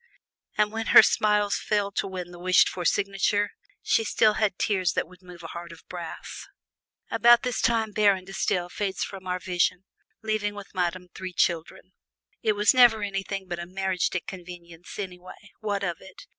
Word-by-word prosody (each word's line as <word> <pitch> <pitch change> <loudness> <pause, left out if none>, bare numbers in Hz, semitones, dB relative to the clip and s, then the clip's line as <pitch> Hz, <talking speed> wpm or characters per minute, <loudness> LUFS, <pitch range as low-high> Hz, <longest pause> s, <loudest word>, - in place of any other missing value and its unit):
And 210 0 +2
when 225 0 -4
her - - +12
smiles 210 -1 +2
failed 205 -2 -1
to - - 0
win 180 -2 -6
the 175 - -11
wished 185 +1 +4
for 180 -2 -5
signature, 200 +1 +1 0.3
she 225 - +2
still 215 0 +3
had 210 -3 0
tears 185 -4 +1
that - - -1
would 180 +1 -18
move 180 -2 -13
a 165 - -7
heart 170 0 -8
of 165 - -15
brass. 175 -2 -8 0.6
About 240 +1 +6
this 250 -2 -1
time 225 -2 +1
Baron 200 -3 +2
De 195 - -10
Stael 180 -2 0
fades 190 +1 -3
from 190 -2 -8
our 180 0 -1
vision, 180 +1 -1 0.4
leaving 215 -1 -1
with 205 -1 -10
Madame 180 -1 -2
three 185 -1 -7
children. 175 +2 -1 0.5
"It 215 - +2
was 210 +3 +4
never 240 -4 +6
anything 195 -1 -4
but 175 -1 -4
a 170 - -6
'mariage 190 0 -1
de 185 - -2
convenance' 175 -2 -10
anyway, 185 +1 -9
what 205 -2 -2
of 175 -4 -2
it 190 -1 -13
190 Hz, 185 wpm, -26 LUFS, 180-210 Hz, 0.6 s, her